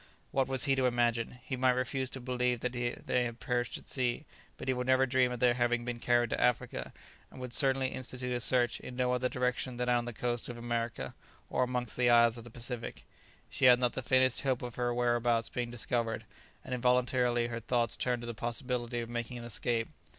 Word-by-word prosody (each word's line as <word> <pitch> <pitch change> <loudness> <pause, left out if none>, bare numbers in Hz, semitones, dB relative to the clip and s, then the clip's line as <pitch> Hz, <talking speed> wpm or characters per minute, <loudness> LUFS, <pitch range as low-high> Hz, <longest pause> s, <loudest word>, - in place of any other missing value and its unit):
What 135 -1 +1
was 135 -1 +3
he 140 - +3
to 130 -1 +2
imagine? 120 0 0
he 130 - -2
might 130 0 +3
refuse 130 +1 -1
to 135 - -6
believe 125 -1 0
that 125 - -1
they 120 0 -1
had 120 -1 -4
perished 120 -1 -1
at - - -14
sea, 130 +3 0 0.3
but - - -8
he 130 - +3
would 125 0 -3
never 130 0 +5
dream 130 -1 +2
of 125 - -4
their 125 0 +4
having 120 -1 +1
been 120 -1 -3
carried 120 -1 +2
to - - -1
Africa, 125 -2 0 0.4
and - - -12
would 125 -1 -6
certainly 135 -1 +3
institute 125 -1 -4
a - - -1
search 120 0 +2
in 125 - -8
no 125 0 +1
other 125 0 0
direction 125 0 -1
than 125 0 -1
on 120 -1 +2
the 120 - -4
coast 120 +1 -2
of 120 - -6
America, 120 -1 -3 0.4
or - - +1
amongst 125 -2 -1
the 125 -1 +4
isles 120 -1 +6
of 115 - -8
the 120 - -11
Pacific. 120 0 -6 0.4
She - - 0
had 125 -1 +9
not 125 -1 +1
the - - -3
faintest 130 0 +3
hope 130 -3 0
of 120 -1 -5
her 120 0 -1
whereabouts 120 -1 +1
being 120 -1 -3
discovered, 115 -1 -1 0.4
and 130 - -4
involuntarily 125 -1 +2
her 115 -1 -3
thoughts 115 0 0
turned 125 -1 -1
to - - -4
the 120 - -4
possibility 120 +1 -2
of 115 - -5
making 120 +1 -3
an 120 - -7
escape. 115 0 -1
125 Hz, 220 wpm, -32 LUFS, 120-125 Hz, 0.4 s, had